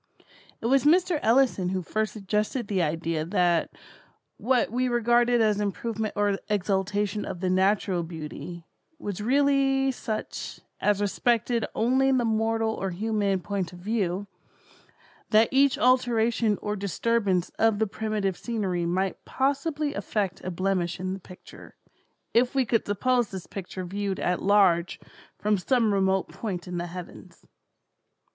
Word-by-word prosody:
It - - -6
was 270 +3 +3
Mr. 345 +1 +3
Ellison 230 -6 +3
who 185 -1 -2
first 215 +4 -1
suggested 210 +3 -2
the 195 -3 0
idea 165 0 -1
that 170 0 +1 0.7
what 250 0 +1
we 255 +2 0
regarded 240 0 +3
as 210 -2 +2
improvement 215 +2 -2
or 205 -1 +1
exaltation 205 +1 0
of 175 - -6
the 185 0 0
natural 190 -1 +2
beauty, 165 +1 -7 0.3
was 205 - -5
really 270 +2 +3
such, 220 -4 -5 0.2
as 205 -1 +1
respected 235 +2 +1
only 260 +4 +3
the 255 -2 +2
mortal 225 0 +1
or 195 -3 -3
human 200 0 0
point 190 -2 -3
of - - -10
view; 195 -1 -1 1.0
that 220 +1 +5
each 275 0 +4
alteration 235 -3 +2
or 210 0 -1
disturbance 200 -2 0
of 225 -2 +3
the 220 - +2
primitive 210 -2 -2
scenery 190 -7 -2
might 185 +2 -1
possibly 285 +2 -1
effect 195 -8 -2
a 185 - -3
blemish 185 -1 -1
in 185 +1 -2
the 195 - -6
picture, 180 0 -14 0.6
if 245 +3 +3
we 265 -2 +3
could 230 -1 0
suppose 240 +3 +1
this 190 -2 -7
picture 185 -1 -6
viewed 195 +1 -3
at 180 0 0
large 190 -4 +3 0.4
from 210 -1 +1
some 230 +1 +2
remote 190 -1 +1
point 185 -5 -5
in 180 -1 -3
the 175 - -3
heavens. 175 0 -10
210 Hz, 140 wpm, -26 LUFS, 185-235 Hz, 1.0 s, that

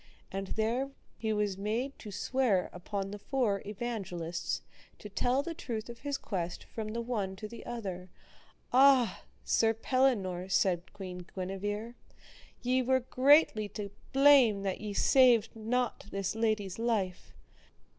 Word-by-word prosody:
And 195 0 -4
there 230 +7 0 0.3
he 220 -1 -2
was 205 -2 0
made 230 +7 -2
to 215 - -8
swear 210 -2 +1
upon 195 +2 -4
the 205 - -6
Four 220 -4 0
Evangelists, 195 -6 -3 0.3
to 210 - -9
tell 250 +7 +1
the 335 - -4
truth 230 -7 -5
of 235 0 -9
his 285 +1 -2
quest 180 -8 -4
from 220 -2 -6
the 235 - -2
one 210 -5 -2
to 215 +3 -7
the 230 +2 -10
other. 190 -6 -5 0.6
Ah! 255 -6 +5 0.2
Sir 225 0 +2
Pellinore, 210 -8 +1
said 180 -2 +1
Queen 180 -3 -8
Guenever, 205 +4 -3 0.7
ye 255 +1 +2
were 260 +1 +2
greatly 255 -4 +4
to 200 0 -6 0.2
blame 270 -7 +6
that 195 -1 -2
ye 210 -1 -4
saved 240 -1 +5
not 230 0 -1
this 195 -1 -2
lady's 215 -3 -1
life. 210 -6 -1
215 Hz, 140 wpm, -31 LUFS, 195-245 Hz, 0.7 s, blame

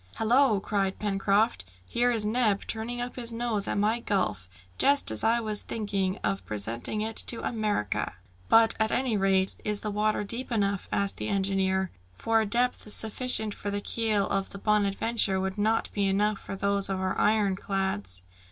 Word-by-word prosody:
"Hallo!" 230 -1 +3
cried 195 -1 -1
Pencroft, 205 - +1 0.2
"here 240 - +1
is 225 -3 +1
Neb 215 -2 +1
turning 230 +2 -4
up 245 +1 -5
his 235 -2 -4
nose 230 -3 -2
at - - -1
my 215 +3 +1
gulf, 145 - -2 0.3
just 280 - +4
as 110 - -2
I 230 +1 +3
was 215 -2 -2
thinking 200 -4 -2
of 95 -1 -1
presenting 110 - -3
it 220 +1 -4
to 235 - -1
America!" 210 - -2 0.4
"But, 225 0 +6
at 220 0 +2
any 255 -2 0
rate, 195 -1 +2
is 210 -1 -1
the 210 - -3
water 210 +1 0
deep 235 +5 -4
enough?" 200 -3 -1
asked 200 0 0
the - - -4
engineer, 190 -1 0 0.2
"for 225 - +1
a 215 - -1
depth 240 -1 0
sufficient 220 0 +5
for 205 - -5
the 205 0 -2
keel 215 -1 0
of 195 -1 -1
the - - -9
Bonadventure, 210 0 +1
would 190 +1 -3
not 220 +2 +1
be 200 -1 0
enough 205 +1 +1
for 195 - -7
those 200 0 0
of 190 -1 -2
our 185 0 -1
iron 205 -2 +2
clads." 105 - -3
205 Hz, 180 wpm, -27 LUFS, 195-225 Hz, 0.4 s, But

